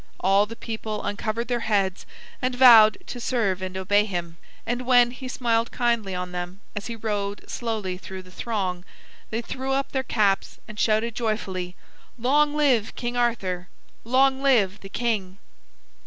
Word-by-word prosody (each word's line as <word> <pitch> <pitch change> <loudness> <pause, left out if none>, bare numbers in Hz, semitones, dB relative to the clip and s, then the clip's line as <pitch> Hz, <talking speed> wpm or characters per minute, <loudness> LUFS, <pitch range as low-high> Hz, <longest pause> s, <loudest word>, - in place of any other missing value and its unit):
All 195 +2 +3
the 230 - -8
people 220 -2 -5
uncovered 215 +3 -2
their 245 -1 0
heads 200 -5 0 0.3
and 255 -1 0
vowed 230 -4 +8
to 245 - -7
serve 220 -7 0
and 185 0 -4
obey 205 +2 +3
him; 175 -5 -5 0.3
and 245 +1 -3
when 245 -1 +5
he 255 +1 -8
smiled 230 -2 0
kindly 235 -6 0
on 180 0 -4
them 180 +1 -5 0.2
as 205 - -4
he 235 - -5
rode 205 -2 -3
slowly 215 -6 -3
through 190 0 -8
the 185 - -16
throng, 185 -4 -3 0.5
they 225 +2 -3
threw 265 +3 -3
up 275 0 -1
their 265 - 0
caps 210 -6 0
and 215 -2 -9
shouted 220 +1 +2
joyfully: 190 -6 -3 0.4
"Long 290 +5 +2
live 260 -8 +2
King 240 0 -3
Arthur! 195 -7 -1 0.4
Long 265 +3 +3
live 215 -8 +3
the 195 - -10
King!" 200 -5 -2
220 Hz, 160 wpm, -25 LUFS, 195-240 Hz, 0.5 s, vowed